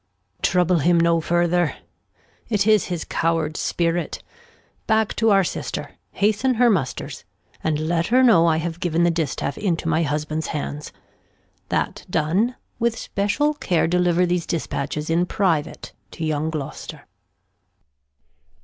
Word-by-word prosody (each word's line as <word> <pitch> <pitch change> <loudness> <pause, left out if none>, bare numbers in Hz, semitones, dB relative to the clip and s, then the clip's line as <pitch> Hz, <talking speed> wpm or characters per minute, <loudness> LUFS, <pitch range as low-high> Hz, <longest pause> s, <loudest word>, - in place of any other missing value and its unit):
Trouble 180 -1 +2
him 170 +3 +3
no 165 0 +3
farther, 175 0 +1 0.7
It 205 -3 +1
is 215 -2 +4
his 175 -3 -4
coward 165 -2 0
Spirit; 170 +1 -1 0.6
back 220 -1 +2
to 225 0 +3
our 195 -2 +5
Sister, - - -4 0.2
Hasten 215 +5 +1
her 240 0 +4
Musters, 150 -11 -2 0.4
and 155 -1 +1
let 165 +2 0
her 255 +3 +4
know 195 -9 +6
I 160 -1 +3
have 165 +1 -4
giv'n 170 -1 +1
the 175 - +4
Distaff 155 -4 -2
into 170 -5 -1
my 160 0 +2
Husband's 155 +1 -2
Hands. 150 -1 -5 0.8
That - - -1
done, 185 +11 +1 0.2
with 235 -1 +1
special 205 +10 0
Care 180 - 0
deliver 180 0 +2
these 175 -1 -1
Dispatches 150 -2 -3
In 175 +2 +2
private 165 -6 -1 0.2
to 160 - -4
young 155 0 -1
Gloster. 155 -4 -6
170 Hz, 135 wpm, -22 LUFS, 160-200 Hz, 0.8 s, know